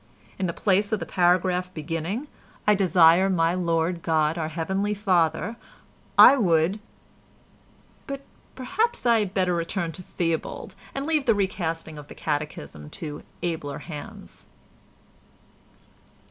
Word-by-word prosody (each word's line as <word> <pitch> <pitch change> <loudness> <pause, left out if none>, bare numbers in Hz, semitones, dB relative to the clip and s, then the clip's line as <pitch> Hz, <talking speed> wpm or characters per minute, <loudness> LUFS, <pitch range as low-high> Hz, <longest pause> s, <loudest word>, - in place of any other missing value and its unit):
In 190 - 0
the - - -1
place 200 +3 +1
of 215 - +1
the - - -4
paragraph 180 0 +2
beginning 165 - -3 0.4
"I 210 - +5
desire 185 -1 +5
my 165 -2 +2
Lord 170 -1 0
God 160 -1 +1
our 160 -2 -2
Heavenly 190 +6 -1
Father" 185 +1 +1 0.6
I 280 - +9
would—but 205 +8 -4 0.3
perhaps 440 - -1
I 235 -2 +5
had 205 -2 -3
better 185 -2 +2
return 170 0 -2
to 185 - -10
Theobald, 165 -2 -3 0.2
and 275 0 -2
leave 310 -3 +1
the 230 -4 +4
recasting 165 -5 -2
of 145 - -11
the - - -11
Catechism 145 - -4
to 150 - -6 0.2
abler 160 -5 -3
hands. 150 -4 -10
180 Hz, 125 wpm, -25 LUFS, 165-205 Hz, 0.6 s, I